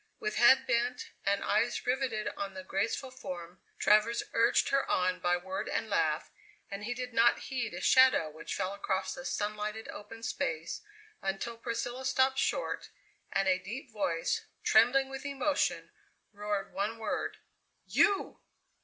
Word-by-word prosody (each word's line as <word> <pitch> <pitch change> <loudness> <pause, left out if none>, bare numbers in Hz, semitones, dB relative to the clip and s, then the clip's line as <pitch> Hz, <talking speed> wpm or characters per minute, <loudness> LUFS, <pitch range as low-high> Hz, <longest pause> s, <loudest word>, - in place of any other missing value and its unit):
With 425 0 -2
head 265 +2 +7
bent 250 0 0
and 200 0 +1
eyes 230 +4 +1
riveted 250 -4 0
on 195 -1 -5
the 185 - -6
graceful 225 +8 -2
form, 180 -8 -8 0.2
Travers 215 +3 +4
urged 230 - +3
her 275 0 +1
on 185 0 +1
by 175 -1 +2
word 190 +2 -4
and - - -2
laugh, - - +1 0.4
and 200 +1 -5
he 245 +2 -2
did 250 0 -5
not 235 +1 +5
heed 250 -4 -2
a - - -5
shadow 260 -10 +6
which 155 +1 -6
fell 190 0 -2
across 195 -1 -2
the 265 - -8
sunlighted, 210 0 -3
open 225 +2 -9
space, 165 -6 -2 0.4
until 195 +5 -3
Priscilla 235 +2 -4
stopped 265 0 +2
short, - - -1 0.4
and 195 0 +1
a 185 -1 +3
deep 230 +7 -7
voice 175 -6 -1 0.2
trembling 260 +5 +5
with 270 0 -7
emotion 280 +1 0 0.4
roared 205 -1 -3
one 210 +3 -2
word: 225 - -3 0.5
"You!" 400 -1 +2
220 Hz, 150 wpm, -31 LUFS, 195-255 Hz, 0.5 s, head